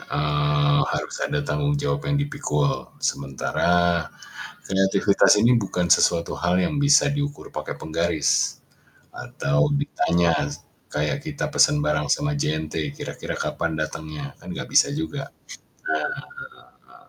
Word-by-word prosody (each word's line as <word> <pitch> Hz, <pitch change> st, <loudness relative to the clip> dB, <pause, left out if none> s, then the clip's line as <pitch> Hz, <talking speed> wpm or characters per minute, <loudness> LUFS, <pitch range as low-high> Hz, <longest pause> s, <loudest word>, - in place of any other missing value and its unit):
eee, 75 Hz, -1 st, +1 dB
harus -, -, -3 dB
ada 145 Hz, 0 st, -1 dB
tanggung 145 Hz, -1 st, 0 dB
jawab 145 Hz, +1 st, -2 dB
yang 145 Hz, -, +2 dB
dipikul, 75 Hz, -, -1 dB, 0.2 s
sementara 85 Hz, +5 st, +1 dB, 0.6 s
kreativitas 95 Hz, +2 st, +4 dB
ini 120 Hz, +3 st, +5 dB
bukan 90 Hz, -5 st, 0 dB
sesuatu 85 Hz, +1 st, +3 dB
hal 90 Hz, +1 st, +1 dB
yang 90 Hz, +10 st, 0 dB
bisa 145 Hz, 0 st, +5 dB
diukur 145 Hz, 0 st, -4 dB
pakai -, -, -5 dB
penggaris 80 Hz, -1 st, 0 dB, 0.6 s
atau 70 Hz, -, 0 dB
ditanya 85 Hz, -, +1 dB, 0.6 s
kayak 75 Hz, -, -1 dB
kita 150 Hz, -2 st, -3 dB
pesen 150 Hz, 0 st, +4 dB
bareng 150 Hz, -, 0 dB
sama 150 Hz, +1 st, +1 dB
JNT 80 Hz, -, -2 dB
kira-kira -, -, -5 dB
kapan 85 Hz, -1 st, -2 dB
datangnya, 75 Hz, -2 st, -5 dB
kan -, -, -11 dB
nggak -, -, -5 dB
bisa -, -, +5 dB
juga, 145 Hz, -2 st, -4 dB, 1.7 s
nah -, -, -25 dB
85 Hz, 120 wpm, -23 LUFS, -, 1.7 s, ini